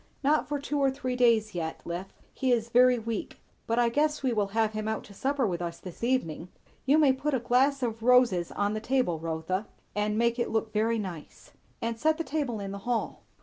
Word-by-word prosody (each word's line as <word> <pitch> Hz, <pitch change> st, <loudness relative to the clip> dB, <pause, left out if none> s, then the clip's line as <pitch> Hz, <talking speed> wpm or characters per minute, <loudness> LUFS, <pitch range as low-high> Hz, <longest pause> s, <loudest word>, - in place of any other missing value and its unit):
"Not 300 Hz, +3 st, +2 dB
for 295 Hz, -, 0 dB
two 285 Hz, +1 st, -2 dB
or 275 Hz, -1 st, +4 dB
three 260 Hz, -2 st, -3 dB
days 230 Hz, -4 st, +3 dB
yet, 160 Hz, -2 st, -3 dB
Liph; 175 Hz, +3 st, -5 dB, 0.2 s
he 260 Hz, -1 st, 0 dB
is 235 Hz, -1 st, +1 dB
very 250 Hz, +1 st, +5 dB
weak; 225 Hz, -1 st, -4 dB, 0.3 s
but 230 Hz, -, 0 dB
I 240 Hz, -1 st, +4 dB
guess 300 Hz, +4 st, 0 dB
we 255 Hz, -2 st, +1 dB
will 210 Hz, -3 st, +1 dB
have 220 Hz, -1 st, +2 dB
him 215 Hz, 0 st, -3 dB
out 220 Hz, 0 st, -2 dB
to 200 Hz, -, -14 dB
supper 270 Hz, +4 st, 0 dB
with 175 Hz, -4 st, -2 dB
us 170 Hz, -1 st, -4 dB
this 180 Hz, +4 st, -10 dB
evening. 180 Hz, -10 st, 0 dB, 0.4 s
You 285 Hz, +3 st, +5 dB
may 290 Hz, -4 st, +5 dB
put 275 Hz, +2 st, -1 dB
a -, -, +1 dB
glass 260 Hz, +3 st, +2 dB
of 225 Hz, -2 st, -2 dB
roses 235 Hz, -8 st, +4 dB
on 205 Hz, +1 st, 0 dB
the 215 Hz, -, -3 dB
table, 250 Hz, -10 st, 0 dB
Rotha, 165 Hz, +5 st, -3 dB, 0.3 s
and 210 Hz, +1 st, 0 dB
make 235 Hz, +1 st, +1 dB
it 240 Hz, -, 0 dB
look 220 Hz, -1 st, -1 dB
very 225 Hz, +2 st, +1 dB
nice. 180 Hz, -7 st, -7 dB, 0.3 s
And 230 Hz, 0 st, -2 dB
set 315 Hz, +3 st, +2 dB
the 330 Hz, -, -2 dB
table 280 Hz, -8 st, -2 dB
in 195 Hz, -1 st, -5 dB
the 200 Hz, -, -6 dB
hall." 240 Hz, +3 st, -2 dB
230 Hz, 225 wpm, -28 LUFS, 205-260 Hz, 0.4 s, very